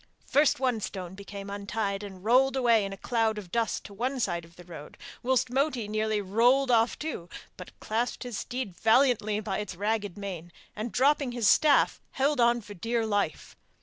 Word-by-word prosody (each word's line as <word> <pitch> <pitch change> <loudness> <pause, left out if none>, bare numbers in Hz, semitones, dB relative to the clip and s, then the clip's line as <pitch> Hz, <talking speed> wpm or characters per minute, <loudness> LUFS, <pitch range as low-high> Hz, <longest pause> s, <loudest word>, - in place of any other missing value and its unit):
First 290 -2 +3
one 250 -4 +1
stone 185 -3 -6
became 200 0 -9
untied 200 0 -3
and 190 -3 -9
rolled 260 +3 +4
away 235 -5 +3
in 195 - -5
a 195 - -7
cloud 225 -1 0
of 190 -5 -8
dust 230 +1 -1
to 205 - -11
one 255 +6 -2
side 170 -7 -1
of 165 0 -17
the 175 - -13
road, 165 -4 -11 0.2
whilst 255 -1 +1
Moti 265 -4 0
nearly 215 0 0
rolled 245 +7 +3
off 230 0 +3
too, 285 - -5 0.3
but 180 - -12
clasped 230 +3 -2
his 245 -4 -5
steed 250 -7 -5
valiantly 225 -2 +3
by 200 -3 -3
its 205 -3 -5
ragged 205 0 -2
mane, 180 -4 -6 0.2
and, 215 +2 -4
dropping 275 -1 +2
his 235 -4 +1
staff, 300 - +4
held 280 +1 +1
on 235 0 +3
for 205 -1 -10
dear 230 +4 -1
life. 205 -7 -2
220 Hz, 185 wpm, -28 LUFS, 200-250 Hz, 0.3 s, rolled